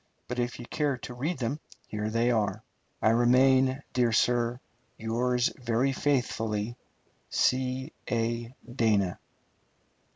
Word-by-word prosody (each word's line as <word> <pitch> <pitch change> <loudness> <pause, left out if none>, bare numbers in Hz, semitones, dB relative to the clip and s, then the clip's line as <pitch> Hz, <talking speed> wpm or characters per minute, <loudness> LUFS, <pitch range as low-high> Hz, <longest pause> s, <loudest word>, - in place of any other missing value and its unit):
But 125 0 -3
if 120 0 -1
you 120 - -8
care 145 0 -1
to 125 - -8
read 145 +8 -2
them 130 +4 -2 0.3
here 105 0 -3
they 115 +2 +2
are. 110 -3 0 0.4
I 110 - +5
remain, 130 +3 +4
dear 125 -2 +3
sir, 120 +1 +2 0.4
Yours 120 +2 +1
very 120 +3 +1
faithfully, 120 -5 0 0.5
C. 130 +2 0 0.2
A. 115 0 -1 0.2
DANA. 105 -7 +2
120 Hz, 120 wpm, -28 LUFS, 115-130 Hz, 0.5 s, I